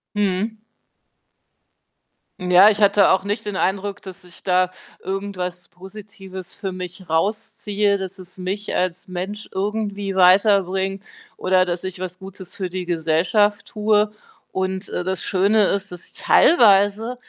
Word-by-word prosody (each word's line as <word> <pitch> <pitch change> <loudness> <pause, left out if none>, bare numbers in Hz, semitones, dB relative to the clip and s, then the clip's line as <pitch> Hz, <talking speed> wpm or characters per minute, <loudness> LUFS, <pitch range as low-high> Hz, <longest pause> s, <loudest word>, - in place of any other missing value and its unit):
Mhm. 205 +2 -1 1.8
Ja, 180 +3 +6
ich 215 0 0
hatte 200 0 +5
auch 190 0 +3
nicht 210 +1 -3
den 200 - -3
Eindruck, 195 +1 -1
dass 190 0 -10
ich 180 -1 -16
da 185 -1 +2 0.3
irgendwas 190 -2 -5
Positives 190 0 -11
für 195 -2 -5
mich 180 0 -8
rausziehe, 205 +3 0
dass 190 0 -7
es 185 0 -13
mich 190 +3 -4
als 180 -1 -2
Mensch 190 +4 -6
irgendwie 200 0 -3
weiterbringt 190 0 +3 0.3
oder, 185 0 +2
dass 175 0 -3
ich 185 0 -6
was 185 0 -6
Gutes 190 -1 -11
für 185 -2 -4
die 180 0 -5
Gesellschaft 175 +5 +1
tue 210 -1 +1 0.4
und, 190 +1 -3
äh, - - -3
das 185 0 -2
Schöne 205 +3 +2
ist, 200 -1 -2
dass 180 -1 -9
ich - - -21
teilweise 215 - +4
190 Hz, 140 wpm, -21 LUFS, 185-205 Hz, 1.8 s, Ja